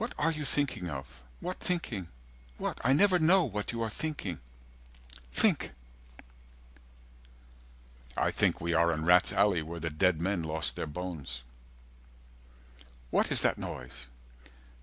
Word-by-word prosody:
"What 230 - -3
are 160 +2 +2
you 155 -2 -4
thinking 135 -12 -1
of? 65 -4 -7 0.2
What 180 +1 -4
thinking? 125 - -2 0.5
What? - - -3
"I 125 - +4
never 180 +5 +5
know 175 +4 +5
what 105 -7 -3
you 115 -1 -2
are 110 - -1
thinking. 105 - -4 0.9
Think." 65 - +2 2.4
I - - +2
think - - +2
we 85 +1 -1
are 85 +1 +4
in 80 -1 -2
rats' 90 +1 +6
alley 100 -4 +3
Where 85 +2 -6
the 80 0 -3
dead 85 +2 +2
men 95 +1 0
lost 80 -1 -1
their - - -3
bones. 75 -6 -5 1.7
"What - - +2
is - - +5
that - - +2
noise?" 60 0 -6
90 Hz, 140 wpm, -31 LUFS, -, 2.4 s, rats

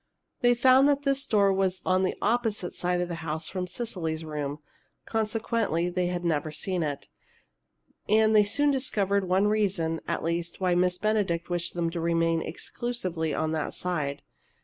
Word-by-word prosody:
They 245 -2 +4
found 260 +3 +5
that 285 0 +1
this 275 -1 0
door 200 -2 +4
was 190 -1 0
on 185 0 +3
the 185 - 0
opposite 225 -6 0
side 180 0 0
of 180 - -1
the 170 -1 -5
house 160 0 -3
from 185 -1 -3
Cecily's 170 -7 -3
room: 145 -2 -4 0.5
consequently, 220 -5 0
they 180 0 0
had 175 0 -3
never 155 -2 0
seen 180 +3 -2
it. 145 -3 -3 1.0
And 220 +1 +4
they 210 - +7
soon 290 +8 +2
discovered 200 -8 0
one 190 +2 +3
reason, 195 -6 +1
at - - -2
least, 170 +1 -2
why 185 -2 +2
Miss 180 0 +2
Benedict 195 -5 0
wished 175 0 -2
them 170 -1 0
to 170 -1 -3
remain 165 0 +1
exclusively 175 -4 -3
on 155 +2 -1
that 155 -2 -2
side. 150 -6 -2
180 Hz, 170 wpm, -27 LUFS, 165-215 Hz, 1.0 s, they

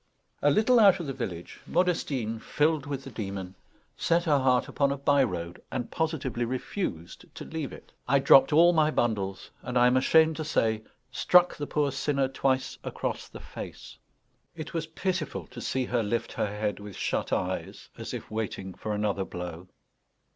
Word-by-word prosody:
A 145 - +4
little 220 - +4
out 195 -3 +6
of 170 - -4
the 135 - -3
village, 95 -10 -6
Modestine, 140 -11 0
filled 150 +3 0
with 140 -2 -4
the 135 - -9
demon, 95 -4 -5 0.4
set 170 +1 +2
her 150 -5 +3
heart 130 -1 +2
upon 140 -1 +1
a 140 - -2
by 140 0 +3
road, 85 -6 -4
and 125 -2 -3
positively 155 -7 -1
refused 120 - -4
to - - -7
leave 160 -4 -4
it. - - -13 0.2
I 140 - +4
dropped 135 0 +6
all 170 +3 +6
my 155 -2 +4
bundles, 100 -9 -1
and, 125 0 -2
I 120 - +6
am 125 +1 +4
ashamed 160 +4 +4
to 160 - -2
say, 110 -7 +1 0.3
struck 180 +6 +4
the 145 - -5
poor 145 -2 +1
sinner 140 0 0
twice 135 0 -1
across - - -4
the - - -11
face. - - -9 0.6
It 155 -2 -7
was 165 -1 -2
pitiful 175 -1 -3
to 125 -1 -10
see 130 +1 -1
her 120 -1 0
lift 115 +2 -2
her - - -1
head 105 0 -3
with 100 -2 -9
shut - - -2
eyes, - - -3
as - - -7
if - - -7
waiting 105 -3 -4
for 105 +2 -4
another 105 -2 0
blow. 90 -1 -7
130 Hz, 180 wpm, -28 LUFS, 110-155 Hz, 0.6 s, out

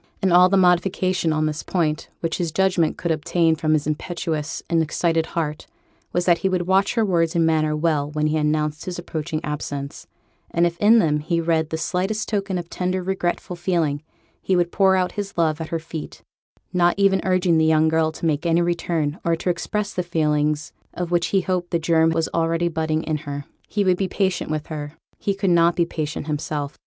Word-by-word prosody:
And 190 -3 +1
all 180 +1 +7
the 195 - +3
modification 180 -1 +2
on 155 0 +1
this 155 0 -2
point 155 -4 -1
which 165 +1 -2
his 170 -2 -1
judgment 185 -2 +1
could 170 - -2
obtain 160 +1 +2
from 155 0 0
his 150 -2 +1
impetuous 155 0 -3
and 165 -1 +2
excited 165 +1 0
heart 155 -2 -3 0.4
was, 175 0 0
that 175 -2 +4
he 190 - 0
would 185 -1 0
watch 190 +4 +2
her 225 -2 +2
words 170 -4 +1
and 165 -1 +3
manner 155 -1 +2
well 150 -2 0
when 150 0 -1
he 155 +1 +1
announced 150 0 0
his 180 -1 -4
approaching 160 -2 -4
absence, 145 -1 -5 0.4
and 170 +1 +2
if 170 -1 0
in 220 +3 +6
them 150 -8 +2
he 165 +3 -1
read 165 -1 +1
the 160 - -2
slightest 190 +6 -2
token 200 -3 -1
of 175 -1 -5
tender 185 +1 -2
regretful 180 -1 -2
feeling, 170 -5 0 0.4
he 190 - +1
would 175 -1 +1
pour 190 -1 +4
out 185 -1 +1
his 205 -3 -6
love 160 -1 +1
at 160 - -5
her 165 - -1
feet, 160 -1 -8 0.5
not 175 -1 +3
even 195 -1 +3
urging 185 -3 +2
the - - +3
young 160 0 +4
girl 160 0 +2
to 160 - -6
make 155 -2 0
any 170 0 +2
return, 170 -3 -1
or 170 0 +2
to 180 +2 -1
express 205 +4 -3
the 180 - -1
feelings 150 -3 0 0.2
of 175 -1 -3
which 175 -1 +2
he 195 - +2
hoped 180 -1 -2
the 170 - +1
germ 160 0 +3
was 165 0 0
already 165 +1 +1
budding 160 -1 -1
in 155 -1 -1
her. 145 -1 -6 0.2
He 205 - 0
would 185 -2 +3
be 195 - 0
patient 190 -2 -1
with 155 -1 -2
her; 150 -2 -6 0.3
he 200 - -1
could 195 -2 0
not 170 0 +4
be 170 - +2
patient 155 -3 -4
himself. 150 -1 -3
165 Hz, 210 wpm, -22 LUFS, 155-180 Hz, 0.5 s, all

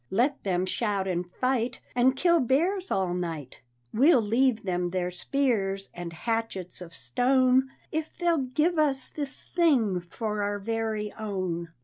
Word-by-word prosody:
"Let 255 +8 +1
them 185 -2 0
shout 200 -1 -1
and 175 -1 -2
fight 255 +1 0 0.2
And 255 +2 +4
kill 340 +3 +4
bears 345 - +1
all 185 -2 0
night; 165 -8 -5 0.3
We'll 265 +1 +5
leave 230 +2 +2
them 180 -2 -1
their 180 0 -2
spears 195 -2 -1
and 175 -1 -6
hatchets 195 -1 -3
of 170 -2 -9
stone 255 +6 +2 0.2
If 315 0 -2
they'll 340 -2 +2
give 310 +6 +1
us 275 -3 +2
this 285 -2 -5
thing 255 - +3
for 210 +4 -4
our 205 0 -1
very 220 0 -2
own. 185 -5 -3
225 Hz, 145 wpm, -27 LUFS, 185-265 Hz, 0.3 s, We'll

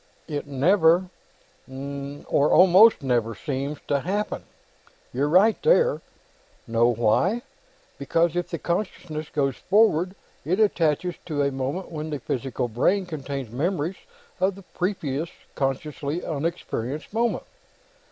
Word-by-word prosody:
"It 145 -3 -4
never... 170 +5 +3 0.6
or 140 +2 -2
almost 190 0 +7
never... 120 -3 0
seems 140 +4 -3
to 140 - +2
happen; 200 +8 -3 0.7
you're 140 +4 0
right 200 +7 +4
there. - - +3 0.6
Know 115 -1 +3
why? 120 - +2 0.6
Because 165 +4 +1
if 175 0 -1
the 170 - -3
consciousness 170 -3 -3
goes 135 -3 0
forward, 190 -3 +3 0.3
it 180 +6 0
attaches 175 -4 +2
at - - -11
a 145 -2 +1
moment 135 +8 -4
when 155 -1 -5
the 150 - -2
physical 130 -2 -3
brain 180 - +1
contains 140 -7 -5
memories 165 +6 -1 0.4
of 190 +1 +1
the 195 - -12
previous, 165 -5 -2 0.2
consciously 140 +3 -2
unexperienced, 155 - -3
moment. 235 +1 0
155 Hz, 120 wpm, -25 LUFS, 140-185 Hz, 0.7 s, almost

